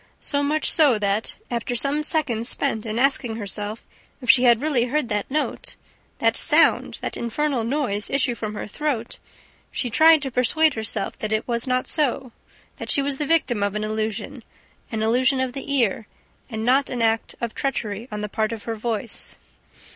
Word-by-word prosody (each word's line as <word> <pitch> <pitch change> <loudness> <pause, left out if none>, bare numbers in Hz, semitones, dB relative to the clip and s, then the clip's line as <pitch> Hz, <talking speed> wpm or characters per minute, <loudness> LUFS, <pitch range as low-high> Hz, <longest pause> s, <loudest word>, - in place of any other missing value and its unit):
So 285 -1 0
much 300 +2 +1
so 290 -8 +5
that, 205 +1 -1 0.2
after 240 0 -2
some 280 +5 +1
seconds 275 -7 -1
spent 225 -6 -1
in 215 +1 -3
asking 250 -3 +1
herself 210 0 -1 0.4
if 250 -4 +5
she 250 0 +3
had 235 -2 +5
really 275 -4 +1
heard 260 -1 -1
that 210 -2 -2
note, 305 - -2 0.4
that - - +2
sound, - - +4
that - - -4
infernal 255 +1 -1
noise 230 -5 -1
issue 265 -3 +1
from 215 -2 -5
her - - -5
throat, 245 0 -3 0.5
she 245 - -3
tried 315 +3 +6
to 270 - -4
persuade 300 +6 +3
herself 220 -2 -2
that 215 - -4
it 215 0 0
was 235 0 -1
not 255 0 0
so, 265 -4 0 0.5
that - - -7
she 280 - +3
was 275 -1 -2
the 295 - -1
victim 275 -9 +2
of 200 0 0
an 210 - -2
illusion, 215 +3 -3 0.5
an 220 -1 -2
illusion 255 +4 +2
of 260 -1 -1
the 275 +1 -6
ear, 230 -6 +1 0.4
and 220 -2 -4
not 265 +3 +3
of - - -3
an 235 - 0
act 225 0 0
of 235 -2 -4
treachery 225 -5 -3
on 210 0 -4
the 210 - -3
part 215 +1 -1
of 225 -2 -6
her 230 - -3
voice.... 225 0 -4
240 Hz, 190 wpm, -23 LUFS, 220-275 Hz, 0.5 s, tried